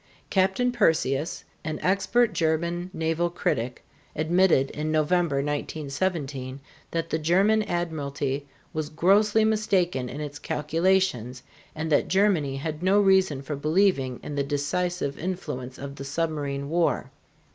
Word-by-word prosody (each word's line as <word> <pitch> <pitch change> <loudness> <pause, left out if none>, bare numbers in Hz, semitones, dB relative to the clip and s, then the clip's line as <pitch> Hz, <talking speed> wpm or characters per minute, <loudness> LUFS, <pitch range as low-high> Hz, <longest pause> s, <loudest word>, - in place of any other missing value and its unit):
Captain 195 +6 +2
Persius, 160 - +1 0.2
an 155 -1 -3
expert 200 +4 +2
German 170 +2 0
naval 165 0 0
critic, 125 -7 -2 0.3
admitted 160 -3 +3
in 155 +1 -3
November, 155 0 +2
1917, 145 -2 -3 0.3
that 165 0 -3
the 160 - +1
German 195 +7 +3
admiralty 145 -7 -2 0.3
was 155 -1 -3
grossly 205 +7 +3
mistaken 185 - +1
in 140 - -6
its 145 -1 -6
calculations 155 - 0 0.3
and 160 +1 -3
that 145 - +3
Germany 185 -8 +2
had 150 +3 -4
no 190 +3 +4
reason 190 -8 +3
for 145 +2 -4
believing 150 -4 +1
in 150 - -6
the 140 -1 0
decisive 145 +2 -2
influence 150 -8 -4
of 140 0 -7
the - - -6
submarine 140 -1 -2
war. 165 -5 0
160 Hz, 125 wpm, -26 LUFS, 140-185 Hz, 0.3 s, no